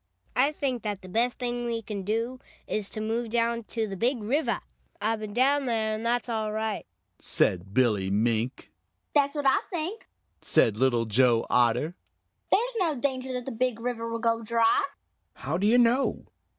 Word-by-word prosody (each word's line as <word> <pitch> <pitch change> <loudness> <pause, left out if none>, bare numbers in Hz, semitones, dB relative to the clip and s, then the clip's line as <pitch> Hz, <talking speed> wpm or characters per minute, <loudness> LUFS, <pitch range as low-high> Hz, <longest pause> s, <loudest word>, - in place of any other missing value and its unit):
"I 270 +4 +4
think 265 -5 -2
that 205 -3 -4
the - - -9
best 235 +6 +1
thing 240 -1 -2
we 230 -1 -2
can 200 -1 -4
do 230 +6 -2 0.3
is 210 -2 -2
to - - -5
move 225 +2 -2
down 235 0 0
to 225 0 -2
the 195 -2 -5
Big 240 +6 +1
River. 255 +9 0 0.4
I've 220 +2 0
been 215 -1 -6
down 270 +5 +3
there, 220 -2 0
and 215 +1 -4
that's 240 +1 0
all 220 -2 -1
right," 220 -1 -3 0.3
said 95 +2 0
Billy 105 -5 +2
Mink. 115 +4 0 0.4
"That's 285 0 +3
what 290 -1 -2
I 265 - +4
think," 355 +5 -4 0.3
said 110 - +3
Little 120 -1 +2
Joe 115 +1 +3
Otter. 125 +7 +3 0.6
"There's 485 +4 +2
no 330 -5 +2
danger 260 0 -1
that 250 -1 -3
the 270 - -4
Big 245 -1 0
River 230 -1 -3
will 230 - -2
go 230 0 +1
dry." 230 +3 +3 0.5
"How 165 - -3
do 205 - +2
you 235 +3 +5
know?" 245 +3 +2
230 Hz, 180 wpm, -27 LUFS, 200-250 Hz, 0.6 s, you